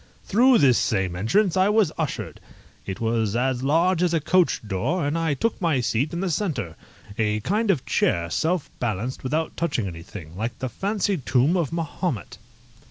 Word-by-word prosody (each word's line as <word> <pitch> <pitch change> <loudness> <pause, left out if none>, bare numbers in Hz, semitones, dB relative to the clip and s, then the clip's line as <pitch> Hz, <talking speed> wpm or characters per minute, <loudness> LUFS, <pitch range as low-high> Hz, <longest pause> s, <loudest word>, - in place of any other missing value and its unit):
Through 245 +5 +4
this 130 - +4
same 95 -6 0
entrance 170 - +2
I 190 +1 +4
was 210 -6 +3
ushered. 155 -5 -4 0.5
It 95 - -4
was 115 -2 0
as 125 +1 0
large 165 +6 +2
as 175 -2 +2
a - - +3
coach 170 -7 +1
door, 130 - -1
and 145 +2 -1
I 165 -3 0
took 225 - -1
my 165 -7 +2
seat 125 +5 0
in 170 - -3
the 190 -2 -1
centre, 150 - -2 0.4
a 105 -1 +1
kind 210 - 0
of 170 -9 +1
chair 85 0 +1
self 165 - 0
balanced 120 +2 -2
without 155 +5 -1
touching 150 -10 -1
anything, 85 -1 -8
like 115 +5 -4
the 130 - -3
fancied 195 - -2
tomb 135 +7 +3
of 170 -7 0
Mahomet. 165 - -3
145 Hz, 175 wpm, -24 LUFS, 115-180 Hz, 0.5 s, Through